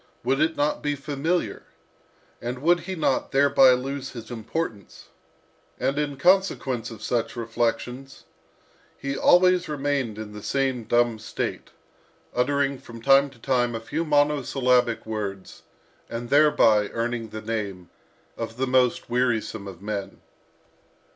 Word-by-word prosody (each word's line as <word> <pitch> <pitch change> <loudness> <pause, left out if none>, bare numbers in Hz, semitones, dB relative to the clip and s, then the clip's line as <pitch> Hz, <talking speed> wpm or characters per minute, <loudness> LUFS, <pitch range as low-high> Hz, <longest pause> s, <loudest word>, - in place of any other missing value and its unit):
Would 135 +3 +1
it 160 +1 +2
not 145 +1 0
be 145 0 -1
familiar? 150 +5 -2 0.8
And 125 +3 -5
would 175 +2 +4
he 190 +2 -5
not 155 -5 0
thereby 135 -1 +6
lose 135 +2 -4
his 115 -1 -9
importance?" 110 - -5 0.7
And 140 +2 0
in 145 -2 -2
consequence 135 - +2
of 110 -2 -10
such 115 -1 -1
reflections, 120 +3 -3 0.7
he 140 0 -3
always 180 +2 +4
remained 140 -6 -1
in 110 -1 -7
the 105 - -8
same 130 -1 -1
dumb 120 -1 +2
state, - - -4 0.6
uttering 140 +2 +1
from 115 -3 -11
time 140 +3 +5
to 135 - -19
time 120 -1 0
a - - -2
few 115 +8 -3
monosyllabic 135 -5 +2
sounds, 100 -3 -5 0.5
and 120 +1 -6
thereby 140 -8 +5
earning 115 -1 -3
the 110 +1 -7
name 100 -6 -4 0.5
of 115 0 -5
the 130 - 0
most 125 -1 +2
wearisome 120 -4 -1
of 95 -1 -10
men. 100 -2 -5
125 Hz, 135 wpm, -25 LUFS, 115-140 Hz, 0.8 s, thereby